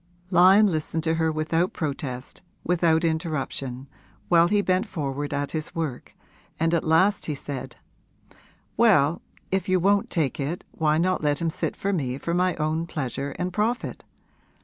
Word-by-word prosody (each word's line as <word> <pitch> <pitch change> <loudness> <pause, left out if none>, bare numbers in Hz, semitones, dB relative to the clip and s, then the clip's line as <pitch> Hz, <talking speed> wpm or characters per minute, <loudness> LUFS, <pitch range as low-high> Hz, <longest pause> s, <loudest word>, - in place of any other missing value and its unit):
Lyon 190 +4 +7
listened 160 -3 -1
to 160 0 +1
her 160 -1 +1
without 160 +3 0
protest, 140 -5 -4 0.2
without 170 -2 +2
interruption, 150 -5 -2 0.4
while 170 -1 +6
he 205 +2 +2
bent 185 +3 +1
forward 145 -5 -3
at 145 0 -2
his 155 -1 -4
work, 155 -7 -4 0.4
and 165 +1 +1
at 170 - +2
last 175 +6 +3
he 150 - -2
said: 140 -1 -6 1.0
'Well, 175 -9 +4 0.3
if 190 -1 -1
you 185 0 +3
won't 200 +3 +2
take 155 -6 -1
it 150 +6 -3
why 155 -1 +1
not 185 +2 +1
let 145 -1 +1
him 165 -1 0
sit - - -3
for 200 +1 -2
me 130 -7 -1
for 170 +4 -3
my 180 0 +2
own 155 +2 -1
pleasure 140 -3 -4
and 180 0 -3
profit? 225 +5 -1
160 Hz, 160 wpm, -25 LUFS, 145-180 Hz, 1.0 s, Lyon